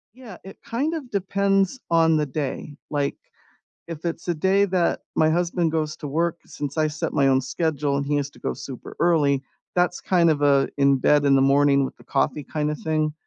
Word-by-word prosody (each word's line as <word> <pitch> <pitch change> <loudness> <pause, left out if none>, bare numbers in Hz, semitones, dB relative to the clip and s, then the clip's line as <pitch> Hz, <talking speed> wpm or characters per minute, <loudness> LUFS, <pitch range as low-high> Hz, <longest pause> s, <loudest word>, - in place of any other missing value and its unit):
Yeah, 240 -8 -11
it 195 - -11
kind 275 +8 -1
of 290 -7 -6
depends 195 +2 +1
on 165 -1 +4
the 150 -1 +1
day, 145 +1 -5
like, 145 -2 -1 0.7
if 165 0 -7
it's 170 +1 -4
a - - +2
day 190 +5 +2
that 180 -3 0
my 155 - +3
husband 170 0 0
goes 155 -1 -2
to 150 - -6
work, 165 +4 -1
since 145 +1 -6
I 155 - +2
set 155 +1 -3
my 135 -1 +2
own 130 0 +3
schedule 145 0 -1
and 140 - -2
he 145 +1 0
has 145 -1 -1
to - - -19
go - - -2
super 130 -3 -9
early, 150 -5 +3 0.3
that's 180 0 +1
kind 175 -3 +2
of 150 -2 +1
a 140 -1 +3
in-bed, 140 +1 +3
in-the-morning-with-the-coffee 140 +1 +2
kinda 150 -1 -2
thing, 155 0 -1
155 Hz, 180 wpm, -23 LUFS, 140-175 Hz, 0.7 s, on